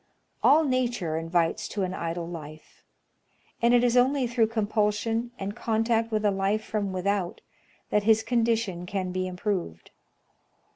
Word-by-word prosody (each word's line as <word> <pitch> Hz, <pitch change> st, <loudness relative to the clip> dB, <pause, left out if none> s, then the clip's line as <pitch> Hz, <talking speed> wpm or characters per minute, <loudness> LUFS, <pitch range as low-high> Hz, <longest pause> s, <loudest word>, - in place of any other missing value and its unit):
All 310 Hz, +3 st, +6 dB
nature 245 Hz, -, 0 dB
invites 165 Hz, +5 st, 0 dB
to 205 Hz, -, -3 dB
an 185 Hz, 0 st, -2 dB
idle 170 Hz, -1 st, -3 dB
life; 155 Hz, -2 st, -10 dB, 0.8 s
and 235 Hz, 0 st, +4 dB
it 245 Hz, 0 st, +5 dB
is 245 Hz, 0 st, +2 dB
only 260 Hz, +2 st, +3 dB
through 235 Hz, -2 st, +2 dB
compulsion, 220 Hz, +1 st, 0 dB
and 200 Hz, +1 st, -5 dB
contact 225 Hz, 0 st, 0 dB
with 215 Hz, -1 st, 0 dB
a 205 Hz, -, +4 dB
life 195 Hz, +2 st, 0 dB
from 210 Hz, -3 st, -2 dB
without, 185 Hz, -1 st, -1 dB, 0.5 s
that 210 Hz, -, +3 dB
his 220 Hz, +1 st, +3 dB
condition 225 Hz, -6 st, 0 dB
can 185 Hz, -1 st, -2 dB
be 185 Hz, 0 st, -2 dB
improved. 180 Hz, -, -4 dB
210 Hz, 145 wpm, -27 LUFS, 185-230 Hz, 0.8 s, All